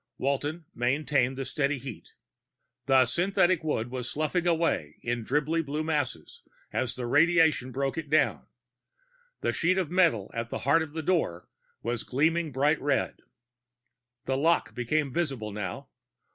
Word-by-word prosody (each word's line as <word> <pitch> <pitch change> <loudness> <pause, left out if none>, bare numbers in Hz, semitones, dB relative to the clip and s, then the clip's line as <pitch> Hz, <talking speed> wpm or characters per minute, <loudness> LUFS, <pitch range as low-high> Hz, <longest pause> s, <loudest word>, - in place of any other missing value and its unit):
Walton 145 +5 -2
maintained 130 +1 +1
the 135 - -3
steady 145 -1 0
heat. 130 -3 -9 0.7
The 130 -1 +6
synthetic 175 +4 +2
wood 120 -6 -1
was 125 -2 -4
sloughing 155 +5 -1
away 165 - 0
in 120 -1 -2
dribbly 150 +6 +1
blue 150 +1 -3
masses 145 - -3 0.3
as 130 -2 -1
the 125 - -4
radiation 155 -1 +3
broke 135 +3 -1
it 150 -3 -7
down; 155 +1 +2 0.9
the - - 0
sheet 185 +3 +1
of 180 -4 -1
metal 165 - +2
in 115 0 -3
the - - -3
heart 145 +4 +4
of 155 -2 -5
the 160 0 -4
door 155 - 0 0.4
was 120 0 -1
gleaming 160 +4 +1
bright 145 +4 +2
red. 140 -1 0 1.1
The 130 0 0
lock 165 +4 +2
became 135 +3 -1
visible 135 -11 -2
now. 100 -3 -5
145 Hz, 145 wpm, -28 LUFS, 125-160 Hz, 1.1 s, The